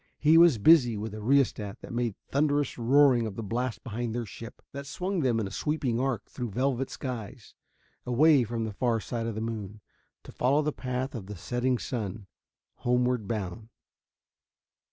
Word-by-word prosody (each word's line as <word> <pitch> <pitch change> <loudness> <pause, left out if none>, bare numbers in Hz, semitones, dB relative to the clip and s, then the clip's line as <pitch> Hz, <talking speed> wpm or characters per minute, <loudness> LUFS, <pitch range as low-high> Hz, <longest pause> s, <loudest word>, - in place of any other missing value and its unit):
He 155 +2 +4
was 165 -6 +7
busy 125 -2 +5
with 105 0 -5
a 110 - -6
rheostat 115 -5 +1
that - - -9
made 120 -3 -1 0.2
thunderous 145 0 +1
roaring 125 -1 +4
of 100 - -7
the 115 - -5
blast 120 +4 -3
behind 120 -1 -4
their 120 -1 -2
ship: 115 +3 -10
that 140 0 -7
swung 185 +6 -2
them 125 -6 +1
in 110 - -1
a 95 - -6
sweeping 140 -6 -1
arc 130 -4 -1
through 125 -3 -5
velvet 130 +4 -1
skies, 120 -6 -7 0.5
away 140 +2 +4
from 115 0 -3
the 110 - -5
far 115 +1 +1
side 115 +2 -4
of 115 - -3
the 110 - -3
moon, 110 -2 -5 0.4
to - - -11
follow 140 +5 +2
the 150 0 -1
path 130 +1 -3
of 110 -7 -7
the 105 - -7
setting 120 +7 -1
sun 110 -4 -4 0.5
homeward 125 -3 +1
bound. 110 0 -4
120 Hz, 175 wpm, -28 LUFS, 110-135 Hz, 0.5 s, was